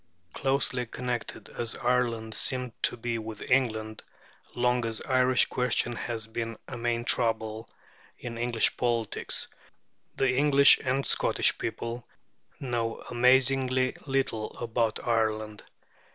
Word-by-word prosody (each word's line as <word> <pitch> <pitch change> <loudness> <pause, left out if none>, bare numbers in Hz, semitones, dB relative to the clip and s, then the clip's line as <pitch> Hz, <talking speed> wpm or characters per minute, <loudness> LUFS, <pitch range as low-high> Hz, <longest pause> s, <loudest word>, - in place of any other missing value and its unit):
Closely 135 -2 0
connected 120 0 -4
as 115 -1 -4
Ireland 120 -3 0
seems 125 +1 -1
to - - +2
be 115 0 -2
with 110 +1 -7
England, 110 -4 +1 0.5
long 125 0 +2
as 115 -1 -2
the - - -6
Irish 130 -1 +4
question 125 -1 0
has 115 -1 -4
been 115 0 -5
a 130 - -6
main 120 0 -1
trouble 110 -2 0 0.5
in 120 -1 -7
English 120 -1 +1
politics, 115 -3 0 0.7
the 130 -1 +2
English 140 0 +6
and 135 +1 0
Scottish - - +2
people 115 0 -4 0.5
know 120 -3 -2
amazingly 130 +1 +3
little 135 -5 -1
about 115 -1 -1
Ireland. 110 -2 0
120 Hz, 120 wpm, -28 LUFS, 115-125 Hz, 0.7 s, English